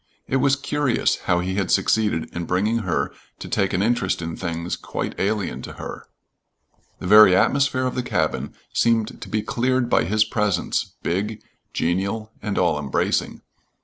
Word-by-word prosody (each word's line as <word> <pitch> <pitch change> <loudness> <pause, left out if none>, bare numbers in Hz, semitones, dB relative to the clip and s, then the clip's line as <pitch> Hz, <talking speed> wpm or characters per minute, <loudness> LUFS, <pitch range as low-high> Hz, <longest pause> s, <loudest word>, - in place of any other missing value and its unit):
It 135 - +1
was 135 +1 +3
curious 140 -2 0
how 90 -1 +3
he 95 +1 -2
had 95 -3 0
succeeded 105 -7 +2
in 85 -1 -3
bringing 105 +7 +1
her 95 -5 -1 0.2
to - - -8
take 95 - 0
an 95 - +1
interest 110 -4 +1
in 80 -1 -4
things 85 -1 -3
quite - - -4
alien 105 0 -1
to - - -8
her. - - -8 0.9
The - - -8
very 105 -1 +8
atmosphere 135 +5 +2
of 130 - -1
the 125 - -1
cabin 90 -10 -1 0.2
seemed 115 -2 +1
to - - -7
be 110 -1 -1
cleared 125 0 0
by - - +4
his 105 +4 +3
presence, 105 -5 -1
big, 105 +5 -2 0.3
genial, 100 +6 -1
and 105 -2 -3
all 85 -5 +2
embracing. 70 -2 -1
105 Hz, 165 wpm, -23 LUFS, 90-115 Hz, 0.9 s, very